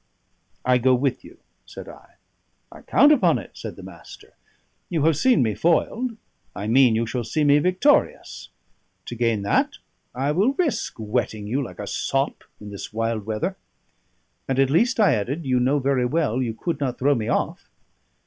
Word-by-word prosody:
"I 125 0 +3
go 130 +1 +3
with 130 0 -1
you," - - -15 0.3
said - - -11
I. - - -15 0.6
"I - - -13
count 290 - +4
upon 295 - +3
it," - - -9
said - - -8
the - - -12
Master. - - -13 0.6
"You 165 -5 -1
have 160 0 +3
seen 255 - +3
me 110 -2 0
foiled; 220 - 0 0.4
I 100 - -5
mean 120 +1 +4
you 115 +1 0
shall 120 +1 -3
see 150 +7 -1
me 145 0 +5
victorious. 185 - +1 0.6
To - - -7
gain 115 -3 0
that 100 - 0 0.4
I 135 +3 0
will 200 - +2
risk 310 -2 -1
wetting 110 -1 -3
you 130 +7 -1
like 120 - -9
a 105 - -6
sop 135 +6 -2 0.2
in 105 -1 -10
this 100 - -8
wild 115 -1 -2
weather." 140 - -2 0.9
"And 135 - -1
at 135 0 +3
least," 235 - +2
I 210 - +5
added, 130 +9 -3
"you 130 -1 +1
know 130 +4 +2
very 135 -2 +1
well 135 -4 0
you 115 -3 -3
could 165 +4 -3
not 130 -4 -2
throw 145 +3 +2
me 115 -5 -3
off." - - -2
130 Hz, 180 wpm, -23 LUFS, 115-160 Hz, 0.9 s, me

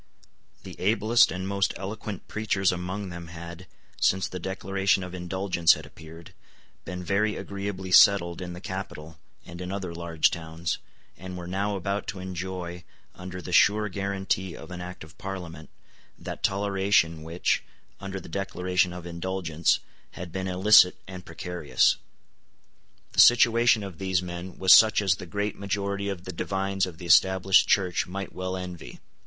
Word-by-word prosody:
The - - -9
ablest 110 +4 +3
and 95 +1 -4
most 100 0 0
eloquent 100 0 -6
preachers 100 -3 0
among 90 +3 -4
them 85 -1 -8
had, 85 +2 -9 0.3
since 95 0 +2
the 90 - -6
Declaration 95 +1 0
of 90 0 -8
Indulgence 90 -1 +2
had 80 - -9
appeared, 80 +2 -13 0.5
been 90 +2 -6
very 105 +3 +1
agreeably 100 -2 -5
settled 90 -2 +5
in 90 -1 -6
the 90 - -9
capital 80 -5 -7 0.3
and 85 +1 -9
in 90 0 -5
other 95 -3 -4
large 85 -2 +1
towns, 80 0 -4 0.4
and 90 0 -7
were 90 - -7
now 100 +3 -2
about 100 +2 -3
to 95 - -5
enjoy, 90 -1 -5 0.3
under 90 0 -8
the 90 - -6
sure 105 +3 +4
guarantee 95 -2 -2
of - - -11
an 90 -1 -6
Act 90 -1 -8
of 75 +2 -16
Parliament, 90 -5 -7 0.5
that - - -7
toleration 95 -4 +1
which, 80 +3 -1 0.4
under 95 -1 -5
the - - -12
Declaration 90 0 -1
of 90 -1 -8
Indulgence, 85 -2 -1 0.3
had 90 -1 -8
been 95 +2 -3
illicit 95 0 +6
and 95 -1 -9
precarious. 85 -1 +1 1.1
The - - -3
situation 120 -2 +6
of 95 -4 -8
these 95 -2 0
men 90 +1 -7
was 95 0 +7
such 110 -1 +7
as 95 -4 +2
the 90 - -9
great 100 +4 -3
majority 100 0 -2
of 95 -3 -5
the 95 - -7
divines 95 0 -1
of 85 -3 -9
the 90 - -9
Established 95 +2 +5
Church 90 -3 +1
might 95 +2 -6
well 95 0 -4
envy. 90 -3 -8
95 Hz, 160 wpm, -26 LUFS, 85-100 Hz, 1.1 s, was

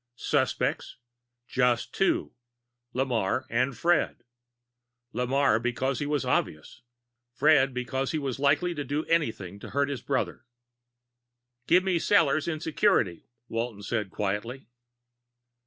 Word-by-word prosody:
Suspects? - - -1 0.5
Just 125 -2 +1
two 195 - +1 0.6
Lamarre, 125 -3 0
and 125 +2 0
Fred. 175 +1 +1 0.9
Lamarre 125 -1 +2
because 125 +2 -1
he 145 - -2
was 145 -3 0
obvious; 75 +9 -2 0.5
Fred 140 0 +4
because 130 +2 -2
he 160 - -1
was 135 -4 -3
likely 150 +5 +2
to 145 -3 -4
do 145 +3 -2
anything 110 - -1
to - - -9
hurt 140 +1 0
his 135 -5 -4
brother. - - -2 1.2
"Give 180 +2 +5
me 185 -3 +1
Sellors 155 -6 +3
in 160 -2 -2
security," 155 - +1 0.2
Walton 115 -3 -4
said 105 -1 -2
quietly. 105 +7 -3
135 Hz, 120 wpm, -27 LUFS, 120-150 Hz, 1.2 s, Give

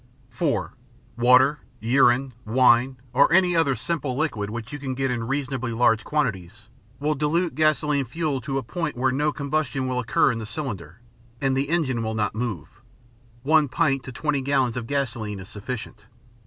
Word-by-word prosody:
(4) - - -1 0.4
Water, 125 +5 +5 0.2
urine, 125 +2 +3
wine, 125 +2 +3 0.2
or - - +5
any 180 0 +4
other 145 -5 +3
simple 140 0 -2
liquid 110 -10 -1 0.2
you 145 - -6
can 135 -2 -4
get 135 0 0
in 115 -2 -3
reasonably 135 -3 -2
large 115 -1 +3
quantities 110 - -3 0.3
will 150 +2 +1
dilute 155 +4 0
gasoline 150 -2 +1
fuel 145 0 -2
to 135 +2 -3
a 135 - -2
point 165 +4 -4
where 130 +1 +2
no 150 +3 +1
combustion 140 -3 -2
will 125 -1 -1
occur 125 +2 +2
in 115 - -4
the 110 - -5
cylinder 115 - -6 0.4
and 135 -1 +1
the 140 +2 -1
engine 145 -8 0
will 110 0 -2
not 105 -2 0
move. 105 -4 -5 0.6
One 155 +1 +4
pint 135 0 +1
to 130 - -7
20 145 +2 -1
gallons 130 -3 +1
of 120 -2 -4
gasoline 120 -7 -2
is 95 - -10
sufficient. 110 -1 -7
130 Hz, 170 wpm, -24 LUFS, 115-145 Hz, 0.6 s, Water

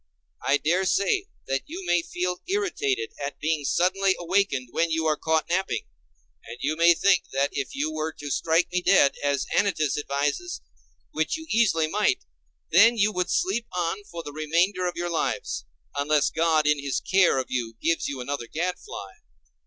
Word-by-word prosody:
I 140 - +3
dare 175 +6 +1
say 375 - +1 0.2
that 135 0 -1
you 360 +4 -7
may 175 - +3
feel 180 +1 -3
irritated 415 +2 -1
at 140 - -5
being 155 -1 0
suddenly 190 +5 +2
awakened 175 -8 0
when 170 0 +1
you 160 0 0
are 155 -1 +3
caught 160 +1 0
napping; 190 +3 -1 0.6
and 115 +2 -9
you 150 +2 -1
may 170 +1 +5
think 190 -1 +3
that 140 +1 +1
if 140 -2 -3
you 150 +3 -1
were 155 +1 -2
to 145 -1 -7
strike 165 +6 +1
me 180 0 0
dead, 180 -6 +5
as 140 -1 +1
Anytus 155 -9 +1
advises, 145 - -2 0.5
which 160 - -1
you 320 - -9
easily 215 -8 +3
might, 205 - +1 0.5
then 225 +8 +6
you 210 0 +3
would 180 -2 -1
sleep 225 +5 0
on 180 +3 -2
for 170 -3 -8
the 145 - -8
remainder 170 +5 +1
of 175 - -3
your 175 0 -2
lives, 165 - -2 0.3
unless 145 +1 +2
God 160 -2 +2
in 150 -1 +3
his 140 -2 -1
care 185 -7 +3
of 130 - -3
you 115 -3 -3
gives 165 0 0
you 135 -2 -4
another 125 -2 -4
gadfly. 165 - -4
165 Hz, 175 wpm, -25 LUFS, 145-190 Hz, 0.6 s, then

